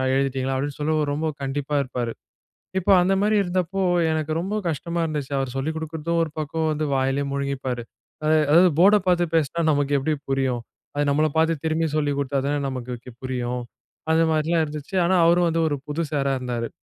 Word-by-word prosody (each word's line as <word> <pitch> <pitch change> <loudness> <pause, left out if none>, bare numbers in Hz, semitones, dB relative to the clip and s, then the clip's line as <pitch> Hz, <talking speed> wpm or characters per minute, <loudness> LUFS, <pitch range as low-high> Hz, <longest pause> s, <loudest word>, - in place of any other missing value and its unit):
எழுதிட்டீங்களா?" 135 -1 0
அப்டீன்னு 145 +1 -3
சொல்லி 155 +1 +1 0.2
ரொம்ப 155 +2 -1 0.2
கண்டிப்பா 145 +2 -2
இருப்பாரு. 120 -2 -3 0.7
இப்ப 185 - 0
அந்த 190 +2 +2
மாரி 210 +1 +2
இருந்தப்போ, 185 +1 -1 0.3
எனக்கு 155 -1 -1
ரொம்ப 190 +5 -2
கஷ்டமா 170 +2 -2
இருந்துச்சு. 150 -4 -3
அவர் 135 -2 -2
சொல்லிக் 150 +4 -2
குடுக்குறதும் 160 +1 -2
ஒரு 160 - -2
பக்கம், 160 +1 -1
வந்து 155 +1 -1
வாயிலயே 135 +1 0
முழுங்கிப்பாரு. 135 -3 -2 0.4
அதா 155 +1 +3 0.2
அதாவது 175 +3 +6
போர்ட 200 +4 +7
பார்த்து 175 -1 +3
பேசினா, 160 +2 0
நமக்கு 145 -1 +1
எப்பிடி 150 +3 0 0.2
புரியும். 130 -3 0 0.3
அது 145 - +1
நம்மள 155 +2 +3
பார்த்து, 160 +1 +3
திரும்பி 160 +1 +1
சொல்லிக் 145 -2 0
கொடுத்தா 140 0 -1
தானே 145 +1 0
நமக்கு 125 -2 -5
கு 125 - -9
புரியும். 125 -1 -2 0.5
அந்த 160 +1 +4
மாரிலாம் 160 +2 +2
இருந்துச்சு. 150 +3 -7
ஆனா, 180 +2 +3
அவரு 170 +1 +5
வந்து 165 0 0
ஒரு 145 - -1
புது 155 +3 -1
சாரா 140 -2 0
இருந்தாரு. 120 -2 -3
150 Hz, 180 wpm, -23 LUFS, 135-165 Hz, 0.7 s, போர்ட